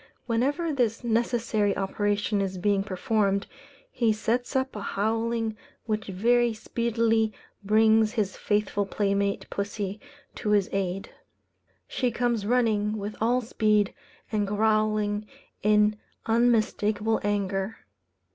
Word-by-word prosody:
Whenever 285 +8 0
this 240 -3 0
necessary 230 -3 +1
operation 205 +1 0
is 190 -1 -2
being 200 +2 +2
performed, 200 +1 0 0.5
he 235 -3 +2
sets 235 +5 -1
up 265 -1 0
a 210 - -5
howling 225 +2 -1 0.3
which 215 -1 -2
very 235 +4 +2
speedily 225 0 +1 0.3
brings 220 +1 +4
his 205 -4 -1
faithful 205 -1 0
playmate 200 0 0
pussy 200 0 -3 0.3
to 210 - -4
his 200 -2 +3
aid. 195 -1 -2 0.8
She 250 - 0
comes 235 -3 -1
running 220 -3 +2
with 205 +1 -5
all 245 +3 +2
speed, 215 -3 +1 0.4
and 210 -2 0
growling 215 0 +1 0.3
in 210 0 +3 0.3
unmistakable 225 -2 +2
anger. 200 0 -2
215 Hz, 110 wpm, -27 LUFS, 205-230 Hz, 0.8 s, brings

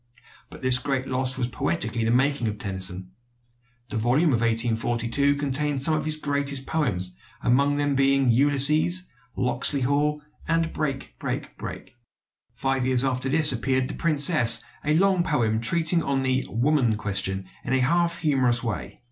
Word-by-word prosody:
But - - -13
this 130 -1 +5
great 135 0 -2
loss 130 0 -1
was 120 - -1
poetically 110 +2 -2
the 115 - 0
making 130 0 +1
of 105 -1 -4
Tennyson. 95 -2 0 0.8
The 130 - -4
volume 130 +8 +1
of 115 - 0
1842 115 +4 0
contained 145 0 -1
some 160 - +3
of 155 - -2
his 155 0 -1
greatest 140 -2 -1
poems, 95 - -1 0.3
among 140 +4 +2
them 145 -1 0
being 135 0 +2
"Ulysses," 145 +7 +3 0.3
"Locksley 125 +3 0
Hall," 145 +3 0 0.2
and 165 0 0
"Break, 140 -3 -5
Break, - - -5
Break." 120 - -9 0.5
Five 135 -1 -2
years 130 0 +2
after 130 0 -2
this 150 +1 +4
appeared 130 +1 -1
"The - - -5
Princess," 145 -7 +4 0.2
a 150 +1 +1
long 190 0 +2
poem 120 -10 0
treating 165 +8 +2
of 135 -2 -1
the 130 0 -1
"woman 120 -1 +1
question" 95 -2 -3 0.2
in 130 - -3
a 130 - +2
half 170 +5 +1
humorous 130 -6 +1
way. 115 -3 -5
135 Hz, 155 wpm, -24 LUFS, 120-145 Hz, 0.8 s, this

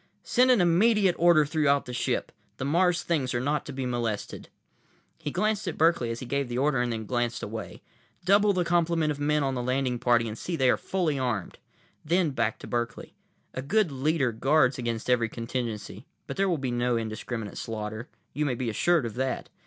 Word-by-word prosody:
"Send 255 +1 +3
an 245 -6 +5
immediate 190 +2 +4
order 170 -3 +5
throughout 145 -2 +2
the 125 - -7
ship. 120 - -1 0.3
The 130 - -3
Mars 175 +4 +2
things 135 -7 -1
are - - +1
not 145 +3 -1
to - - -5
be 135 -1 -4
molested." 120 -4 -3 0.7
He 150 - -4
glanced 210 +5 0
at 175 - -3
Berkeley 160 -7 +3
as 115 0 -4
he - - -5
gave 140 +1 -2
the 120 - -3
order, 135 -1 +2
and 120 -1 -1
then 110 -1 -4
glanced 120 +1 -1
away. - - -7 0.4
"Double 205 +2 +5
the 180 -3 0
complement 170 -2 +2
of 145 - -5
men 150 0 +1
on 135 -1 0
the 125 - -2
landing 125 0 -1
party 120 -1 +3
and 110 - -5
see 175 +9 -4
that 135 - -1
they 130 - +6
are - - +3
fully 165 -7 -1
armed." 120 -8 -3 0.4
Then 170 0 +1
back 115 -4 -1
to - - -8
Berkeley, 120 -1 -3 0.4
"A 130 - -4
good 175 +5 +1
leader 135 -1 +1
guards 135 +2 +2
against 115 -2 -3
every 120 -2 +2
contingency. 115 -2 -5 0.2
But - - -6
there 195 0 +1
will 170 - +1
be 135 -3 -3
no 120 0 +1
indiscriminate 110 0 -5
slaughter. 110 +1 -5 0.2
You 150 - -1
may 130 - 0
be 120 -1 -2
assured 165 +5 +2
of 115 - -4
that. 130 +2 -2
135 Hz, 205 wpm, -27 LUFS, 120-165 Hz, 0.7 s, they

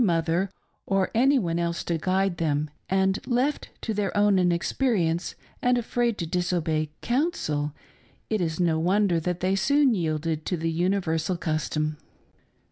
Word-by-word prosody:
251 170 -2 +2
tpother - - -27 0.4
or 195 -1 +1
any 270 +5 +4
one 170 -7 0
else 170 0 -1
to 170 -2 -1
guide 190 +1 +1
them, 150 -2 0 0.2
and 190 0 +2
left 260 +4 0
to 225 - -2
their 205 -2 -1
own 205 -2 +4
inexperience 175 0 +1 0.3
and 245 0 +3
afraid 240 -1 0
to 170 - -2
disobey 165 -3 0
"counsel" 240 - 0 0.6
it 215 -3 0
is 160 -1 -2
no 165 -3 +2
wonder 185 +1 +2
that 175 +1 -3
they 185 +2 +2
soon 280 +4 +3
yielded 160 -3 -1
to 180 - -2
the 165 +1 -1
universal 175 -1 0
custom. 155 -1 -1
180 Hz, 150 wpm, -26 LUFS, 165-205 Hz, 0.6 s, any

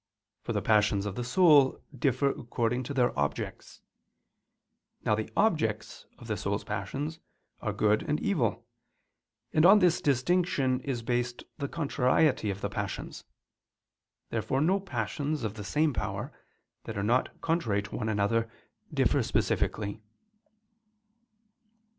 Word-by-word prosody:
For - - -4
the - - -1
passions 105 -2 +3
of 100 - -3
the 120 - -4
soul 145 0 +5 0.2
differ 135 +1 +1
according 120 0 -2
to 140 - -4
their 125 -2 +2
objects. 70 0 -3 1.2
Now - - +3
the 110 0 -1
objects 110 - 0
of - - -12
the - - -2
soul's - - -2
passions 155 +4 -4 0.4
are - - -1
good 105 0 +2
and 150 - +1
evil; 155 - 0 0.9
and 155 - +4
on 195 +4 +9
this 180 -4 +3
distinction 140 -2 +1
is 130 -3 -4
based 120 0 -1 0.2
the 140 - -2
contrariety 140 -5 +2
of 100 0 -4
the - - -1
passions. - - -5 1.1
Therefore 130 - -1
no 180 +7 +3
passions 145 - -3
of 105 -2 -2
the 105 -1 -7
same 150 +6 +1
power, 100 +6 -3 0.5
that - - -5
are 100 - -1
not 120 +5 +1
contrary 115 -12 0
to 105 - -8
one 110 - -2
another, 110 +2 +1 0.4
differ - - +2
specifically. 105 0 -1
125 Hz, 135 wpm, -29 LUFS, 110-150 Hz, 1.2 s, on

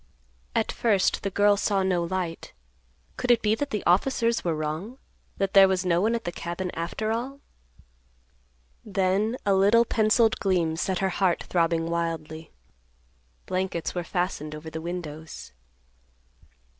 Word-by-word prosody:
At - - +1
first 205 -5 +1
the 200 - -2
girl 205 +1 +4
saw 200 -1 +1
no 180 -2 +1
light. 175 -1 -4 0.6
Could 250 - -3
it 240 -1 +4
be 210 0 +3
that 285 +6 -2
the 210 -5 -3
officers 230 +5 +2
were 170 -2 0
wrong? 155 +11 -4 0.4
that 195 -1 -1
there 195 -1 +8
was 190 -1 0
no 175 -1 +2
one 225 +3 +2
at 230 - -3
the 175 - -3
cabin 175 +2 -4
after 175 +6 -3
all? 255 +5 -3 1.4
Then 205 +3 0
a 200 - +3
little 205 +5 +5
penciled 220 0 +2
gleam 175 -5 +1
set 185 +3 -1
her - - +1
heart 185 -1 +1
throbbing 165 -1 +1
wildly. 165 -2 -3 1.0
Blankets 185 -2 -2
were 175 - -3
fastened 175 -4 -3
over 155 +1 -9
the 160 - -5
windows. 160 - -7
185 Hz, 145 wpm, -26 LUFS, 170-210 Hz, 1.4 s, there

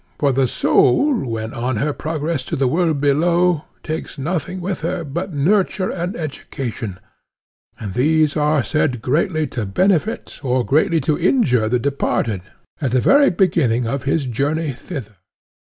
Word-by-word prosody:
For 140 -2 +2
the 130 0 +2
soul 280 - +3 0.2
when 110 0 -4
on 125 +1 -2
her 145 +7 0
progress 155 -1 -3
to 165 - -3
the 135 -3 +1
world 160 +1 +1
below 170 +3 +2 0.2
takes 160 0 -5
nothing 175 +5 -3
with 185 +1 -3
her 170 +1 -2
but 170 +6 -4
nurture 185 +5 +1
and 180 +2 -3
education; 120 - -5 0.8
and 105 -4 -5
these 155 +4 +2
are 150 -2 +2
said 130 -6 0
greatly 155 +3 +1
to 115 -5 -2
benefit 190 - 0
or 125 -3 0
greatly 160 +3 +2
to 150 +3 0
injure 135 - +2
the 125 - +2
departed, 120 -6 -1 0.4
at 140 - +1
the 125 +2 +2
very 280 - +5
beginning 160 - +2
of 135 +4 -2
his 140 +2 0
journey 145 +6 -1
thither. 125 - -8
150 Hz, 150 wpm, -20 LUFS, 125-170 Hz, 0.8 s, very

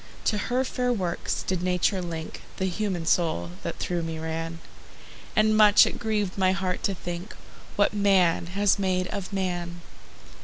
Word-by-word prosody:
To 210 - +1
her 250 +2 +2
fair 250 -1 -1
works 185 -7 -2
did 185 -2 -1
Nature 180 +1 +1
link 165 -2 -6 0.2
The 190 - -1
human 185 -2 -2
soul 160 - +1
that - - -4
through 175 -1 -2
me 165 -1 -4
ran; 165 +1 -4 0.8
And 215 0 +4
much 210 -1 +7
it - - -4
grieved 210 -4 -1
my 185 0 +4
heart 185 -2 -2
to 195 - 0
think 175 +3 -6 0.4
What 205 - +3
man 190 -5 +3
has 200 +3 +2
made 185 -1 +1
of 200 -2 -5
man. 175 -3 -3
185 Hz, 160 wpm, -26 LUFS, 170-205 Hz, 0.8 s, much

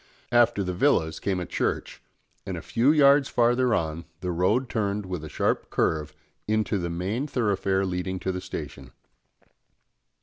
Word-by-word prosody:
After 120 -4 +4
the 90 -1 -3
villas 90 - +2
came 95 -2 -1
a 90 - -3
church, - - -2 0.4
and - - -5
a - - -6
few 125 +5 +3
yards 140 -2 +5
farther 120 0 +3
on 80 0 -3 0.2
the 90 - -2
road 100 +10 +1
turned 105 -3 -2
with 90 -4 -5
a 80 - -7
sharp - - -1
curve 75 -1 -1 0.3
into 110 -1 +1
the 85 -1 -3
main 95 - -2
thoroughfare 100 -6 0
leading 95 0 -3
to 95 - -1
the 90 0 -4
station. - - -7
100 Hz, 160 wpm, -26 LUFS, 90-120 Hz, 0.4 s, yards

